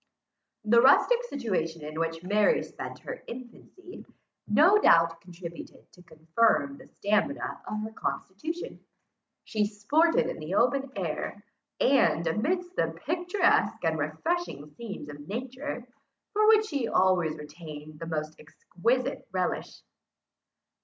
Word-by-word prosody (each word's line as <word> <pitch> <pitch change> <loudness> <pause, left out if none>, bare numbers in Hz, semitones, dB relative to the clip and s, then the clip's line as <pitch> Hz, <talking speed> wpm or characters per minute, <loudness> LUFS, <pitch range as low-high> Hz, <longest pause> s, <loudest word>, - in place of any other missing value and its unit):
The 235 +2 +6
rustic 470 - +5
situation 185 - -2
in 155 +1 -5
which 165 0 -2
Mary 205 +3 +3
spent - - -8
her - - -7
infancy, 255 +10 -10 0.4
no 320 - +6
doubt 165 - +4
contributed 170 -1 -10
to 180 - -18
confirm 180 - +1
the 260 - -14
stamina 210 +7 -1
of 215 0 -3
her 220 - -5
constitution. 310 - -5 0.6
She 215 -2 0
sported 285 +12 +2
in - - -4
the 155 +5 -4
open 270 +4 +2
air, - - -4 0.3
and 255 -10 +3
amidst 350 - -1
the - - -1
picturesque 355 - +2
and 160 -1 +1
refreshing 155 - -2
scenes 205 -8 -7
of 145 0 -10
nature, 255 +4 -5 0.5
for 425 +1 +3
which 435 -1 +6
she 280 - -2
always 180 -6 +2
retained 150 0 -10
the 165 - -6
most 155 -1 -4
exquisite 230 - -2
relish. 185 -1 -2
210 Hz, 125 wpm, -28 LUFS, -, 0.6 s, The